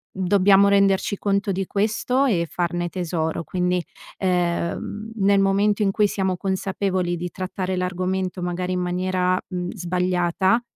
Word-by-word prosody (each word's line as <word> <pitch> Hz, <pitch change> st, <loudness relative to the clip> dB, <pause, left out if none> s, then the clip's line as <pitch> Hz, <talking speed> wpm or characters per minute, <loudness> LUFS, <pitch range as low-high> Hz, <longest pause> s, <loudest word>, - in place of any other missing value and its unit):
dobbiamo 195 Hz, +1 st, +4 dB
renderci 200 Hz, 0 st, +3 dB
conto 200 Hz, 0 st, 0 dB
di 190 Hz, 0 st, -2 dB
questo 220 Hz, +7 st, 0 dB
e 180 Hz, -10 st, +1 dB
farne 175 Hz, 0 st, -1 dB
tesoro, 170 Hz, -2 st, -2 dB
quindi, 180 Hz, 0 st, -1 dB, 0.3 s
ehm, 180 Hz, +4 st, -1 dB
nel 200 Hz, -1 st, +3 dB
momento 200 Hz, +2 st, +2 dB
in 195 Hz, -, +2 dB
cui 210 Hz, +1 st, +3 dB
siamo 190 Hz, -2 st, -1 dB
consapevoli 190 Hz, -1 st, -1 dB
di 175 Hz, +1 st, -5 dB
trattare 185 Hz, 0 st, -3 dB
l'argomento 185 Hz, 0 st, -2 dB
magari 180 Hz, +1 st, -2 dB
in 180 Hz, -, -1 dB
maniera, 185 Hz, 0 st, 0 dB
mhmm, 180 Hz, -1 st, -4 dB
sbagliata, 180 Hz, +2 st, +1 dB
185 Hz, 135 wpm, -23 LUFS, 180-195 Hz, 0.3 s, dobbiamo